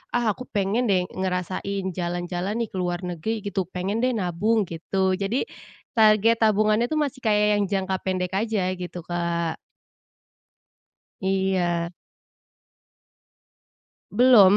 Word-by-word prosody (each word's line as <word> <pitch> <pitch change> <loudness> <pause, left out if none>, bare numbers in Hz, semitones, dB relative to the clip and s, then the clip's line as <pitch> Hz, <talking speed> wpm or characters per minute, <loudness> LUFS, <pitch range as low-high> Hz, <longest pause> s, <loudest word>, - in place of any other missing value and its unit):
ah, 235 -3 +2
aku 255 +5 -8
pengen 210 +5 +1
deh 185 -2 +3
ngerasain 190 +1 -2
jalan-jalan 175 +3 -2
nih 220 - -6
ke 190 - -6
luar 175 0 -1
negeri 185 +5 -3
gitu, 190 -3 -1
pengen 190 +4 -2
deh 255 - +3
nabung 205 +3 +1
gitu, 185 +3 -1
jadi 200 +6 0 0.5
target 220 +1 +5
tabungannya 215 +1 +3
itu 310 - 0
masih 280 -4 -1
kayak 210 -2 +3
yang - - +2
jangka 190 -1 0
pendek 185 -1 -2
aja 215 -4 0
gitu, 180 -1 -6
Kak. 170 -1 -1 1.6
Iya. 190 -3 +1 2.2
Belum 210 -4 +7
195 Hz, 120 wpm, -25 LUFS, 180-215 Hz, 2.2 s, Belum